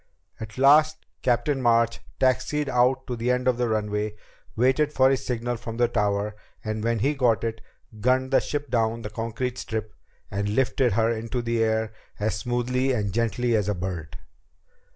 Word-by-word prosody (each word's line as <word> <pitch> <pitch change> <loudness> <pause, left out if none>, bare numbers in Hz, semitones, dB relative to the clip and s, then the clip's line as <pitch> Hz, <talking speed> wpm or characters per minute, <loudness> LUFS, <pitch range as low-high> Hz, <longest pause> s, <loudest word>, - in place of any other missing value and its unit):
At 110 0 -8
last 155 +4 +5 0.2
Captain 130 +3 +1
March 115 -1 +3 0.2
taxied 135 +3 +1
out 130 +1 +2
to 125 - -4
the 120 +1 -2
end 125 0 +1
of 125 -2 +3
the 120 -1 +1
runway, 105 -1 -1 0.4
waited 130 +5 +2
for 130 -2 +4
his 135 - 0
signal 120 0 -2
from 115 0 -7
the 120 0 +3
tower, 105 -2 0 0.3
and 110 0 -3
when 115 0 +1
he 135 +8 +1
got 125 -6 +2
it, 115 -1 -3 0.4
gunned 130 +4 +1
the 135 - +5
ship 145 -3 -4
down 115 -1 0
the 105 - -6
concrete 115 +2 -3
strip 110 -1 -4 0.4
and 100 +1 -1
lifted 130 -2 +2
her 115 +2 +2
into 115 +2 -3
the 115 -1 +1
air 110 0 0 0.3
as 105 +1 0
smoothly 125 +4 0
and 105 -5 -1
gently 115 +1 +1
as 105 -2 +1
a 105 - 0
bird. 90 -4 -5
115 Hz, 175 wpm, -25 LUFS, 110-130 Hz, 0.4 s, last